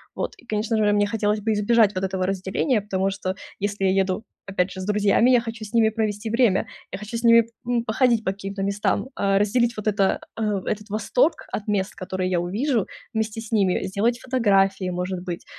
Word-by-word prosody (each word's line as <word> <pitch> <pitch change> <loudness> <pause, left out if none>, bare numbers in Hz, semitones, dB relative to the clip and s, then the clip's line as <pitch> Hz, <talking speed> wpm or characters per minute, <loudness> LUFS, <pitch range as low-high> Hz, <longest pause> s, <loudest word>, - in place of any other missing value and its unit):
Вот - - -2
и, 385 - -19
конечно 215 0 -1
же, 210 -1 +3
мне 205 0 +3
хотелось 210 0 0
бы 220 +2 0
избежать 210 0 +3
вот 185 0 -1
этого 190 -1 -1
разделения, 195 +6 0
потому 195 -2 -1
что 190 -1 -3 0.2
если 205 0 -2
я 190 - +4
еду, 190 +2 0 0.2
опять 190 -1 -1
же, 190 - -8
с 185 - -4
друзьями, 210 +3 +3
я 250 -2 +5
хочу 225 -1 -6
с 210 - -12
ними 225 -2 +4
провести 215 -1 -2
время, 230 -3 +2 0.3
я - - -2
хочу 215 +3 -5
с 230 - -6
ними, 230 -1 +6 0.2
м, 240 -1 +1
походить 235 0 +2
по 190 - 0
каким-то 195 0 -5
местам, 200 +3 0
а, 195 0 +2
разделить 235 +3 +2
вот 215 0 -5
это 200 -2 +2 0.2
а 210 -3 0
этот 210 0 -4
восторг 220 - +1
от 205 - -4
мест, 205 -2 0
которые 185 -1 -3
я 175 - +2
увижу 220 - 0 0.3
вместе 220 0 -2
с 225 - -11
ними, 195 -5 +2
сделать 215 +5 0
фотографии, 195 -7 +2
может 180 0 -3
быть, 175 -1 -6
205 Hz, 210 wpm, -23 LUFS, 195-225 Hz, 0.3 s, ними